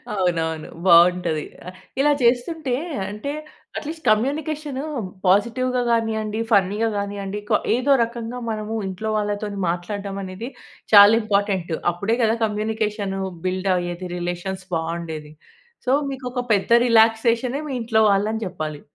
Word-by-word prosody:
అవునవును, 165 -4 -1 0.2
బాగుంటది. 170 -2 +5 0.2
ఆహ్, 185 0 -9 0.2
ఇలా 295 +2 +4
చేస్తుంటే, 255 +4 +1 0.4
అంటే, 210 +7 -5 0.5
అట్లీస్ట్ 315 0 -6
కమ్యూనికేషను 285 +4 0 0.4
పాజిటివ్‌గా 240 +6 +2
గానీయండి, 220 -2 0
ఫన్నీగా 205 +2 +3
గానీయండి, 200 0 -4
క - - -4 0.2
ఏదో 255 +4 +1
రకంగా 235 +1 -5
మనము, 215 0 -3
ఇంట్లో 190 +4 -4
వాళ్ళతోని 205 -1 -2
మాట్లాడటం 195 +3 -4
అనేది, 190 +6 -6 0.4
చాలా 205 0 +10
ఇంపార్టెంటు. 200 -6 0
అప్పుడే 200 +6 -1
గదా 225 +1 +2
కమ్యూనికేషను 210 -2 -2 0.2
బిల్డ్ 185 +1 -1
ఆయేది, 175 0 -3
రిలేషన్స్ 175 +2 -4
బావుండేది. 160 -2 -4 0.5
సో, 255 - +1 0.2
మీకొక 250 -1 -5
పెద్ద 200 +2 0 0.2
రిలాక్సేషనే 230 +3 +3
మీ - - -3
ఇంట్లో 225 -1 +2
వాళ్ళని 210 +3 0
చెప్పాలి. 155 -5 -5
210 Hz, 115 wpm, -22 LUFS, 185-230 Hz, 0.5 s, చాలా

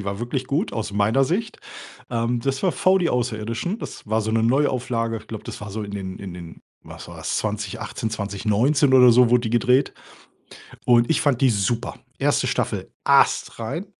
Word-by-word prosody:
die - - -7
war 100 0 -3
wirklich 125 +2 -3
gut, 155 - -1
aus 110 -2 -4
meiner 105 +7 +2
Sicht. 195 - -2 0.5
Ähm, 120 0 -1
das 135 +1 -2
war 185 - +2
„V 185 +1 +3
die 175 -2 0
Außerirdischen.“ 120 - -2
Das - - -9
war 110 +1 0
so 110 +1 -2
‘ne 115 0 +2
Neuauflage. 120 -3 0
Ich 105 - -17
glaube, 110 -2 -7
das - - -8
war 105 -1 -7
so 110 +2 -4
in 100 - -7
den 95 -2 -6
in 95 -2 -7
den, 85 -2 -11 0.2
was - - -11
war‘s? - - -4
2018, 105 +2 -4
2019 110 +7 +1
oder 125 -2 +8
so 125 0 +5
wurde 125 0 +3
die 115 - -3
gedreht 125 +3 +2 0.9
und 120 -1 +4
ich 160 - +2
fand 140 -4 +1
die 135 - +4
super. 115 +3 -1 0.2
1. - - +1
Staffel, - - -2
astrein 135 - +1
115 Hz, 190 wpm, -22 LUFS, 105-130 Hz, 0.9 s, oder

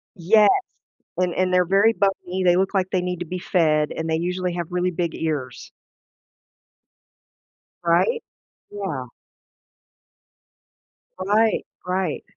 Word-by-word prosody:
Yes, 205 +5 +5 0.7
and 180 -1 0
and 185 0 0
they're 180 0 +4
very 200 +5 +4
bumpy, 190 -2 -1
they 175 0 +5
look 195 +2 0
like 185 -1 +1
they 185 - +1
need 180 -1 -3
to 175 - -4
be 180 +2 -4
fed 155 -5 +1
and 160 0 -4
they 160 - +1
usually 180 +1 -2
have 170 -2 -3
really 180 0 0
big 170 -1 -2
ears. 140 -7 -4 2.1
Right? 315 - +2 0.5
Yeah. 175 -11 -4 2.1
Right, 210 +4 +2 0.2
right, 180 -3 -2
180 Hz, 120 wpm, -23 LUFS, 170-190 Hz, 2.1 s, Yes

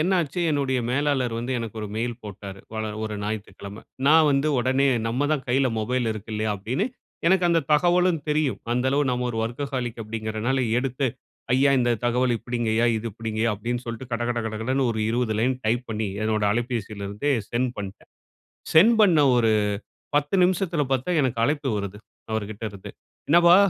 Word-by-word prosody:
என்னாச்சு 175 -1 +1
என்னுடைய 135 -3 +1
மேலாளர் 130 -3 +1
வந்து 120 +3 -3
எனக்கு 115 -2 -6
ஒரு 105 - -4
மெயில் 120 +2 -1
போட்டாரு. 100 -1 -8 0.4
ஒரு 110 -1 -3
ஞாயிற்றுக்கிழமை. 105 -1 -6 0.2
நான் 155 +1 +6
வந்து 140 +2 +2
உடனே 130 +3 +2 0.2
நம்ம 130 +5 0
தான் 145 -4 -1
கையில 130 +2 +3
மொபைல் 120 +2 0
இருக்கு 110 +1 -8
இல்லையா 110 0 -1
அப்படின்னு, 120 - -1 0.4
எனக்கு 185 +1 +4
அந்த 170 -1 +3
தகவலும் 175 +1 +3
தெரியும். 150 -3 +1
அந்த 125 +1 +1
அளவு 145 +2 +2
நம்ம 125 0 -1
ஒரு 115 - -5
வொர்க்கஹாலிக் 120 0 -3
அப்படிங்கிறனால 110 +3 -2 0.2
எடுத்து, 135 +1 -1 0.5
"ஐயா 140 +1 +4
இந்த 120 -1 +2
தகவல் 125 +1 +2
இப்படிங்க 120 0 -3
ஐயா 115 +2 +3
இது 110 +1 -4
இப்படிங்கயா" 110 +1 -1
அப்படின்னு 120 +4 -3
சொல்ட்டு, 115 +2 -6
கடகட 120 +1 -1
கடகடன்னு 120 +4 0
ஒரு 110 - -3
20 115 -2 0
லைன் 130 +2 +1
டைப் 120 +3 0
பண்ணி, 110 -1 -2 0.2
என்னோட 110 -1 0
அலைபேசில 115 -3 -3
இருந்தே 105 +9 -1 0.2
சென்ட் 125 +1 0
பண்ட்டேன். 100 -1 -8 0.6
சென்ட் 215 +9 +7
பண்ண 180 -7 +5 0.2
ஒரு 115 -2 +3 0.6
10 145 +4 +1
நிமிசத்தில 180 -3 +1
பாத்தா, 135 +6 0
எனக்கு 125 -4 0
அழைப்பு 145 +2 0
வருது. 100 0 -5 0.3
அவரு 110 -1 0
கிட்ட 110 +1 -9
இருந்து, 100 -2 -10 0.4
"என்னப்பா 175 +2 +7
120 Hz, 165 wpm, -24 LUFS, 110-140 Hz, 0.6 s, சென்ட்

